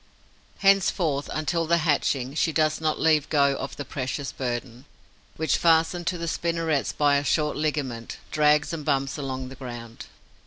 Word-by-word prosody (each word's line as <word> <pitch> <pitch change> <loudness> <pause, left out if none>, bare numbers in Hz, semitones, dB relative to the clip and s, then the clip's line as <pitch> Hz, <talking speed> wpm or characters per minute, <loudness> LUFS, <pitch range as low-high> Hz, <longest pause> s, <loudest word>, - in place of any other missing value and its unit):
Henceforth, 180 -7 +2
until 165 +2 -1
the 170 +1 +4
hatching, 140 -4 +1
she 160 +1 +1
does 155 0 +1
not 155 -1 0
leave 155 -2 +3
go 140 -2 +3
of 135 - -5
the 145 - -6
precious 135 0 -4
burden, 120 0 -5 0.5
which, 160 0 +1
fastened 165 +1 +2
to 180 - 0
the 170 0 -4
spinnerets 165 -3 0
by 145 -1 +3
a 140 - -1
short 150 0 +1
ligament, 140 -7 -3
drags 150 +1 +3
and 160 -2 -4
bumps 140 0 0
along 130 -2 -4
the 135 - -10
ground. 120 -2 -8
150 Hz, 160 wpm, -25 LUFS, 135-160 Hz, 0.5 s, the